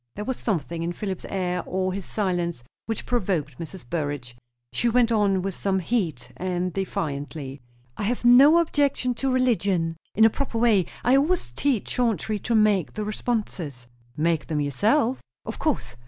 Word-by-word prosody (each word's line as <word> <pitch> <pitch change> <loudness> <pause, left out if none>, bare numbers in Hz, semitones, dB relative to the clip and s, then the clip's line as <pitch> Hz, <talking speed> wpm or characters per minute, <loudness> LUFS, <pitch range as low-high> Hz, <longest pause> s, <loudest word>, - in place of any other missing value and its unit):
There 210 - -5
was 260 +1 -2
something 170 - -2
in 170 +1 -2
Philip's 190 0 -5
air 180 -2 -1
or 185 0 -1
his 195 -1 -3
silence 175 - -1 0.2
which 225 -1 -3
provoked 180 - -1
Mrs. 165 -4 -8
Burrage. 145 -5 -3 0.4
She 235 - +2
went 235 0 +3
on 200 -4 +2
with 195 0 -2
some 195 +2 0
heat, 180 - -1
and 180 -1 -2
defiantly. 145 -6 -4 0.4
"I - - -3
have 240 +2 -1
no 270 +7 +8
objection 285 -6 +1
to 265 +3 -1
religion, 200 -10 +1 0.2
in 220 - +6
a - - +7
proper 275 -3 -3
way. 220 -7 +3 0.2
I 250 - +5
always 300 - +1
teach 235 - 0
Chauncey 220 -3 0
to 230 +4 -1
make 210 -5 +3
the 215 - -2
responses." 205 - -3 0.3
"Make 165 0 +1
them 155 -2 -1
yourself?" 225 - +1 0.2
"Of - - -6
course." 125 +2 -1
195 Hz, 165 wpm, -25 LUFS, 165-235 Hz, 0.4 s, no